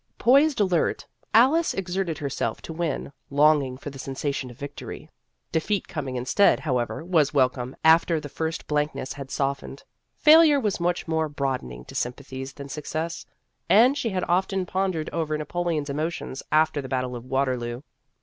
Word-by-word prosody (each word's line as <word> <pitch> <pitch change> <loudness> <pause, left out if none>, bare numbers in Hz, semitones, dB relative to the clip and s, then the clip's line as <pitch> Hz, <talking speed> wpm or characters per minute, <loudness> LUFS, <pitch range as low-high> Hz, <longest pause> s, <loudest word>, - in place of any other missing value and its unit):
Poised 275 +2 +4
alert, 185 -5 +1 0.3
Alice 280 +9 +4
exerted 185 -3 -2
herself 140 -6 -2
to 160 - -6
win, 160 -4 -3 0.2
longing 140 -2 +3
for 145 +2 -7
the 135 - -11
sensation 135 0 -3
of 120 - -13
victory. 145 0 -8 0.4
Defeat 190 +5 0
coming 140 -7 -4
instead, 130 +11 +3
however, 130 +2 -2
was 160 -5 +2
wel 130 -2 +5
comed 125 0 -7
after 160 0 +5
the 150 - -7
first 160 +3 -4
blankness 150 -3 -1
had 140 -1 -8
softened. 135 0 -3 0.3
Failure 305 -1 +7
was 210 -8 -1
much 175 0 -1
more 160 -1 0
broad 135 -3 -1
ening - - -10
to - - -12
sympathies 130 +1 -4
than 140 - -9
success; 155 +3 -4 0.4
and 245 +6 +6
she 245 -5 -1
had 185 -3 -2
often 190 +1 +1
pondered 185 -4 -1
over 155 -2 -1
Napoleon's 160 -1 -2
emotions 150 -1 -3
after 155 -1 +3
the 130 - -8
battle 130 -1 -2
of 120 - -7
Waterloo. 130 -2 -2
150 Hz, 160 wpm, -25 LUFS, 135-175 Hz, 0.4 s, Failure